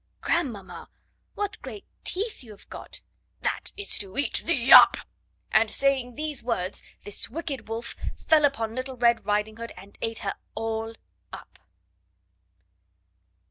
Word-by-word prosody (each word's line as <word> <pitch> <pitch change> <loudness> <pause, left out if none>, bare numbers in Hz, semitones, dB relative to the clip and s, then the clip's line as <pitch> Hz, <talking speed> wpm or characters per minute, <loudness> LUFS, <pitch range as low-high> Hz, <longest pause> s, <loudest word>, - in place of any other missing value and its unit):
"Grandmamma, 255 - -2 0.5
what 410 +1 -3
great 410 - -8 0.2
teeth 415 - -2
you 235 - -14
have 210 - -14
got!" - - -9 0.4
"That - - -1
is 410 - -1
to 195 -2 -6
eat 285 - 0
thee 270 -6 +4
up." - - +11 0.5
And, 220 0 +5
saying 265 -2 +1
these 300 -2 -2
words, 190 -5 -2 0.2
this 205 - -2
wicked 275 -4 -4
wolf 225 +1 -4 0.3
fell 315 -2 +6
upon 230 -6 +2
Little 255 +1 -4
Red 235 -3 +3
Riding 210 +1 +1
Hood, 230 0 -6
and 195 +2 -14
ate 225 0 -1
her 195 - 0 0.2
all 225 0 -2 0.4
up. - - -11
235 Hz, 140 wpm, -27 LUFS, 220-285 Hz, 0.5 s, up